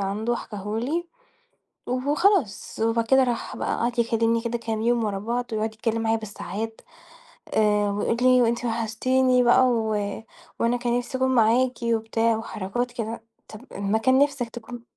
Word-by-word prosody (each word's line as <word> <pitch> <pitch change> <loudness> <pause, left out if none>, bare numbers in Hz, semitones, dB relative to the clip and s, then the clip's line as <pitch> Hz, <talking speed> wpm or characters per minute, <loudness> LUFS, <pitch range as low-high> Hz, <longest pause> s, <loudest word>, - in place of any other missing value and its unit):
عنده 210 +5 -1
حِكاه 210 0 -5
لي 330 +8 -2 0.8
وخلاص. 285 - +1
وبعد 230 0 +1
كده 265 +1 +5
راح 240 -2 -3
بقى - - -1
وقعد 240 +1 -2
يكلّمني 230 0 +2
كده 235 0 -2
كام 225 -1 -3
يوم 235 -1 +2
ورا 200 -2 -2
بعض 235 +4 -2
ويقعُد 220 0 -2
يتكلّم 225 0 -1
معايا 225 0 +2
بالساعات 220 +1 -6 0.7
آآ 210 -1 +3
ويقول 205 +3 -1
لي 255 0 +5
وأنتِ 235 +1 0
وحشتيني 250 +3 +2
بقى 245 +2 +5
و 225 -3 0 0.6
وأنا 235 +1 +2
كان 240 0 0
نفسي 250 +1 -4
أكون 260 0 +2
معاكِ 240 +3 +4
وبتاع 225 0 +1
وحركات 225 +3 -4
كده، 230 -2 -5 0.3
طَب 215 - -10
أمّا 200 +2 0
كان 260 +3 +3
نفسك 280 -4 +1
تكون 240 +1 -9
230 Hz, 155 wpm, -24 LUFS, 220-245 Hz, 0.8 s, كده